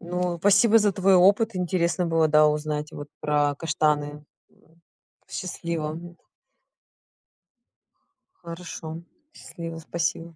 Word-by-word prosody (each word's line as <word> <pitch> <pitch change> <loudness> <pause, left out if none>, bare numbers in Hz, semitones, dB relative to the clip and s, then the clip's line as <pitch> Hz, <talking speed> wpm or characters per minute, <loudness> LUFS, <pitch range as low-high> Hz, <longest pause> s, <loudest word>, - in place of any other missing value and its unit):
Ну, 180 0 -2
спасибо 210 +4 +5
за 205 -2 +2
твой 195 0 +3
опыт 200 +3 +4
интересно 175 0 0
было, 165 -1 +2
да, 150 0 +5
узнать 150 0 -2
вот 145 0 -8
про 145 -1 +1
каштаны. 150 -2 -1 1.1
Счастливо. 165 -4 -4 2.5
Хорошо. 165 -1 -7 0.3
Счастливо. 165 - -9
Спасибо. 165 0 -3
165 Hz, 95 wpm, -25 LUFS, 150-180 Hz, 2.5 s, спасибо